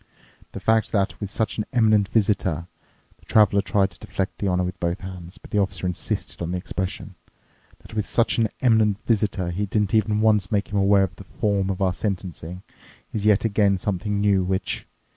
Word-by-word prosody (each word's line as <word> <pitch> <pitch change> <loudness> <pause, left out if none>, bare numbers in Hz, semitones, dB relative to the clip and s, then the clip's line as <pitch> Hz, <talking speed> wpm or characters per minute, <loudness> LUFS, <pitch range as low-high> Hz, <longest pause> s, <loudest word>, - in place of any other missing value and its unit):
The - - -5
fact 110 0 +2
that 100 -2 0
with 100 - -3
such 110 +1 -2
an 105 - -1
eminent 110 -4 +3
visitor"—the 90 -7 -2
traveler 100 -2 +4
tried 100 -1 +1
to - - -17
deflect 100 -2 -4
the 100 - -1
honour 90 -1 +1
with 90 0 -4
both 85 +2 -2
hands, 90 -1 -8
but - - -15
the 105 - +2
officer 95 -2 -1
insisted 90 -1 -3
on 85 - -2
the 90 - -1
expression—"that 95 +3 -8
with 105 -2 -2
such 115 0 +2
an 110 -2 +2
eminent 110 -5 +3
visitor 100 -5 0
he 100 +4 -2
didn't 105 +1 0
even 105 -1 +2
once 105 -3 +3
make 105 -1 0
him 105 - 0
aware 100 0 +4
of 95 -3 -3
the - - -10
form 100 -1 -1
of 95 0 -1
our 95 -1 +2
sentencing 90 -3 -4 0.5
is 105 -1 -1
yet 105 +1 +4
again 100 -2 +3
something 100 +2 -2
new, 100 -2 +3
which 95 0 -1
100 Hz, 190 wpm, -24 LUFS, 95-105 Hz, 0.5 s, traveler